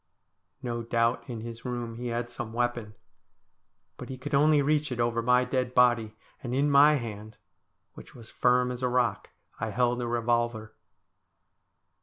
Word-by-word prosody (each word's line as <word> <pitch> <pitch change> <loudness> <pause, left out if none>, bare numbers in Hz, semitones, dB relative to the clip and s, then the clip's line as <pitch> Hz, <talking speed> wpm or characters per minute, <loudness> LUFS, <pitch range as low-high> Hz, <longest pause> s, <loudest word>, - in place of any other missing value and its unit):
No 120 -1 -3
doubt 115 +1 0
in 115 -3 -5
his 115 0 -8
room 120 -2 -4
he 125 +1 -5
had 120 0 -2
some 120 -2 -7
weapon, 120 -3 -2 1.0
but - - -9
he 130 - -6
could 140 +4 -7
only 150 +2 +4
reach 150 0 +1
it 120 - -4
over 120 0 +1
my 125 +1 +3
dead 125 0 -2
body, 120 -3 +3 0.3
and 125 -2 -4
in 145 +2 +2
my 145 +2 +6
hand, 110 -4 -6 0.6
which - - -14
was 115 -2 -13
firm 125 0 +2
as 125 0 -6
a 125 - +1
rock, 120 -5 0 0.3
I 115 - -2
held 120 +2 0
a 120 - -2
revolver. 120 -2 -1
120 Hz, 165 wpm, -28 LUFS, 115-125 Hz, 1.0 s, my